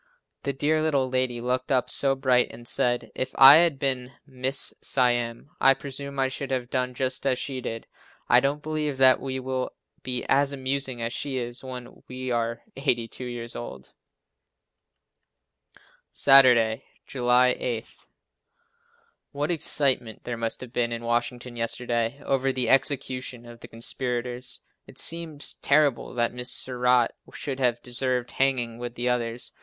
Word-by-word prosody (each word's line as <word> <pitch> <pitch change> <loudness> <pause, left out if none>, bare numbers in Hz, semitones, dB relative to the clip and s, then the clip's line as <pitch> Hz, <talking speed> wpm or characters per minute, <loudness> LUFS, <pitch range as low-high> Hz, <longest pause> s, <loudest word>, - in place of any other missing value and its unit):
The 140 - -2
dear 150 +3 0
little 140 -4 +1
lady 130 -1 -1
looked 125 +2 -2
up 130 -2 +2
so 135 -1 +2
bright 130 -2 +2
and 120 0 -12
said, 120 0 0
"If 130 - -4
I 135 +3 +10
had 165 -4 +3
been 130 -1 -2
Mrs. 130 0 -2
Siam, 120 0 0
I 135 0 +5
presume 140 0 -6
I 135 0 +2
should 135 +1 -5
have 125 -2 -3
done 125 -1 -1
just 130 0 -2
as 130 -2 +1
she 130 -1 -4
did." 115 -1 -5 0.4
I 120 - +6
don't 140 +3 -1
believe 150 -3 -2
that 130 -1 +6
we 130 -1 -4
will 130 0 -3 0.3
be 125 -1 -2
as 140 +1 +3
amusing 135 -2 -2
as 115 +1 -3
she 140 -2 -3
is 120 0 -5
when 125 -2 -9
we 130 0 -5
are 115 0 -2
82 125 -3 -2
years 120 -1 -6
old. 65 - -9 2.2
Saturday, 125 -5 +5 0.2
July 125 -1 +2
8. 115 -2 -4 1.4
What 145 +3 -1
excitement 140 -8 0
there 120 - -4
must 115 -1 -4
have 125 -1 -10
been 120 -1 0
in 115 0 -5
Washington 120 +1 -2
yesterday 120 +1 -1
over 135 0 +1
the 125 -3 -1
execution 130 -2 0
of 120 0 -12
the - - -11
conspirators. 125 +1 -1 0.3
It - - -15
seems 165 -3 +2
terrible 140 -4 +1
that 120 -1 0
Mrs. 125 0 -5
Surratt 125 -1 +2 0.2
should 135 -2 -5
have 120 -2 0
deserved 125 0 -1
hanging 125 -4 0
with 120 0 -6
the 120 +1 -2
others. 120 -1 -2
125 Hz, 150 wpm, -25 LUFS, 120-135 Hz, 2.2 s, I